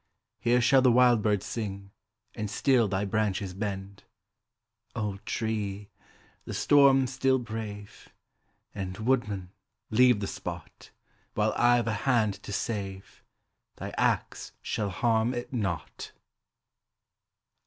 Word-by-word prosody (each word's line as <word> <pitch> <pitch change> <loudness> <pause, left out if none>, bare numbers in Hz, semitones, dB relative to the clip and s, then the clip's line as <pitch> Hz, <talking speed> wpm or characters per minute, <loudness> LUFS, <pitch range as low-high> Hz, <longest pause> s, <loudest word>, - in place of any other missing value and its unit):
Here 120 +1 +3
shall 130 +2 +5
the 130 -1 +5
wild 120 -2 +5
bird 105 -2 +1
sing, 100 -3 -5 0.4
And 105 -2 -4
still 125 -1 +3
thy 100 +1 -1
branches 100 -2 -1
bend. 100 0 -5 0.9
Old 105 -4 -3
tree! 105 -3 -3 0.5
the - - -6
storm 140 -2 +5
still 130 +1 +1
brave! 110 -4 -7 0.6
And, 95 -2 -5
woodman, 110 -6 -1 0.4
leave 125 0 +5
the 100 - -2
spot; - - -7 0.5
While 105 0 +1
I've 120 0 +4
a 110 - 0 0.2
hand 110 -6 +2
to - - -8
save, 100 -3 -4 0.5
thy - - -6
axe - - -1
shall 105 -2 -2
harm 115 +5 +1
it 120 +2 -6
not. 95 -9 -4
110 Hz, 115 wpm, -28 LUFS, 100-120 Hz, 0.9 s, shall